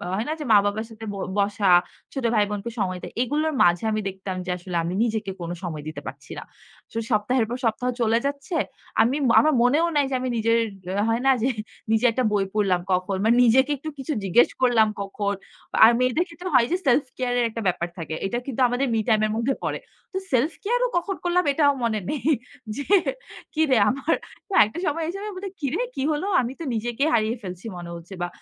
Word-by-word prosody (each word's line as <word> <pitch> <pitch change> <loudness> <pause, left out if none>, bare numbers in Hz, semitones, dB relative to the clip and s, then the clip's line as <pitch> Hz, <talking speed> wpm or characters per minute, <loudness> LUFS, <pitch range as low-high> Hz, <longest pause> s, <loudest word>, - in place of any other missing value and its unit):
হয় 215 +4 -1
না - - 0
যে 300 - -4
মা-বাবার 205 +1 +3
সাথে 225 0 -10
ব - - -6 0.2
বসা, 200 0 +1 0.4
ছোট 270 - -4
ভাই-বোনকে 210 +1 0
সময় 185 -2 -1
দেয়, - - -8
এগুলোর 300 +5 0
মাঝে 175 +2 +3
আমি 215 - 0
দেখতাম 190 0 -6
যে - - -6
আসলে 180 0 -7
আমি 170 +2 -2
নিজেকে 220 -4 -1
কোনো 170 0 -4
সময় 155 -4 -5
দিতে 155 - -6
পারছি - - -9
না। - - -8 0.5
সো - - -5
সপ্তাহের 225 +3 +2
পর 245 - -3
সপ্তাহ 230 +3 0
চলে 225 0 +3
যাচ্ছে। 280 +3 -3 0.5
আমি 235 +4 +3 0.2
আমার 310 0 +3
মনেও 290 +7 +4
নাই 290 -1 +3
যে 270 - -1
আমি 255 0 -2
নিজের 230 +1 +2 0.5
হয় 230 +1 +1
না - - +7
যে 250 - +2 0.4
নিজে 225 +2 +3
একটা 255 +3 0
বই 200 -2 +2
পড়লাম 195 -4 +2
কখ 180 0 +3 0.2
মানে 230 +2 +5
নিজেকে 260 +5 +4
একটু 310 +4 -6
কিছু 270 +3 -3
জিজ্ঞেস 195 +5 +4
করলাম 240 -4 +4
কখন। 200 +1 -2 0.5
আর 225 - +9
মেয়েদের 255 +6 +2
ক্ষেত্রে 345 +2 -7
হয় 245 -2 +6
যে 355 - +2
সেলফ 265 +2 +4
কেয়ারের 245 -1 0
একটা 230 +1 -5
ব্যাপার 175 -1 0
থাকে। 160 -2 -5
এটা 215 +5 -1
কিন্তু 265 -2 -3
আমাদের 245 +3 0
মি 225 - +2
টাইমের 215 -2 +3
মধ্যে 235 +4 +1
পড়ে। - - -2 0.3
তো - - -2
সেলফ 260 +5 +2
কেয়ারও - - +1
কখন 385 +3 -1
করলাম, 355 +1 +2
এটাও 285 -1 +4
মনে 220 -2 +1
নেই। 290 -6 -3 0.5
যে 285 - -3 0.7
কিরে, 310 -5 +3
আমার 275 +6 0 0.4
না, - - +2
একটা 220 - -7
সময় 325 +2 -1
এসে 350 +4 -4
আমি 425 - -4
বলি, 390 +1 -5
কিরে, 295 - -1
কী - - -2
হলো? 300 +4 -1 0.2
আমি 245 +1 -4
তো - - -5
নিজেকেই 240 +6 0
হারিয়ে 220 +1 +2
ফেলছি 180 0 -7
মনে 175 -1 -7
হচ্ছে 170 +3 -10
বা 175 - 0
235 Hz, 205 wpm, -24 LUFS, 205-280 Hz, 0.7 s, আর